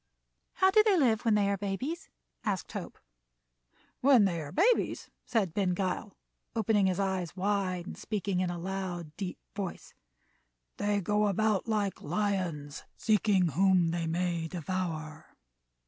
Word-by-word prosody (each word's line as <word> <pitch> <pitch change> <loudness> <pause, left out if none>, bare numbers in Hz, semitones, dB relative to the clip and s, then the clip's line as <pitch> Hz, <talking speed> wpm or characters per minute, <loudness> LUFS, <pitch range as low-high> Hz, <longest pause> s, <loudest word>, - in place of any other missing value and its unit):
"How 380 0 +4
do 430 - +7
they 420 -3 +3
live 240 -7 +2
when 225 -2 +4
they 205 -1 +3
are 200 0 +1
babies?" 205 - -4 0.3
asked 200 -4 -2
Hope. - - -6 1.0
"When 255 -5 +6
they 170 -4 0
are 145 - -7
babies," 445 +9 +2 0.2
said 220 -9 +1
Ben 185 -2 +1
Gile, 190 +2 -3 0.4
opening 215 -3 +3
his 185 0 0
eyes 190 -3 -1
wide 190 -2 0
and - - -7
speaking 200 -3 -2
in 185 -1 0
a 175 - -3
loud, 175 -3 -4
deep 190 -3 -4 0.2
voice, 195 -3 -5 0.8
"they 205 0 +1
go 210 +2 +2
about 210 +1 +1
like 210 -3 -1
lions 175 -5 -2
seeking 205 -4 +3
whom 180 +1 +3
they 170 -1 -2
may 170 0 -1
devour." 160 -3 -4
195 Hz, 145 wpm, -30 LUFS, 175-210 Hz, 1.0 s, do